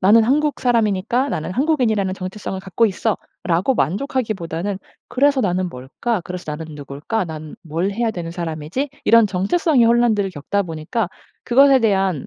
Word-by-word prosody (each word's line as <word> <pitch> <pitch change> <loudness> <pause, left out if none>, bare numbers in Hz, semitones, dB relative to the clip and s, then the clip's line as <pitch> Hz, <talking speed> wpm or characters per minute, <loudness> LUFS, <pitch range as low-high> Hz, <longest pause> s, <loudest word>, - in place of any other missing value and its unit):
'나는 215 +4 +6
한국 295 +4 +1
사람이니까 235 +1 +1
나는 160 - -3
한국인이라는 230 -8 +1
정체성을 190 +1 -5
갖고 200 +4 +1
있어.'라고 195 0 -1
만족하기보다는 200 - -2 0.3
그래서 280 +1 +3
'나는 185 -4 0
뭘까? 170 - -3
그래서 180 0 -6
나는 155 0 -7
누굴까? 145 +9 -3
나는 155 -2 -8
뭘 165 +4 -2
해야 225 +2 0
되는 170 -5 -5
사람이지?' 170 - -4
이런 230 -1 +6
정체성의 235 - +2
혼란들을 230 -4 +3
겪다 185 +6 -1
보니까 170 +5 -3 0.4
그것에 270 +2 +6
대한 195 - +1
200 Hz, 390 characters per minute, -20 LUFS, 170-235 Hz, 0.4 s, 나는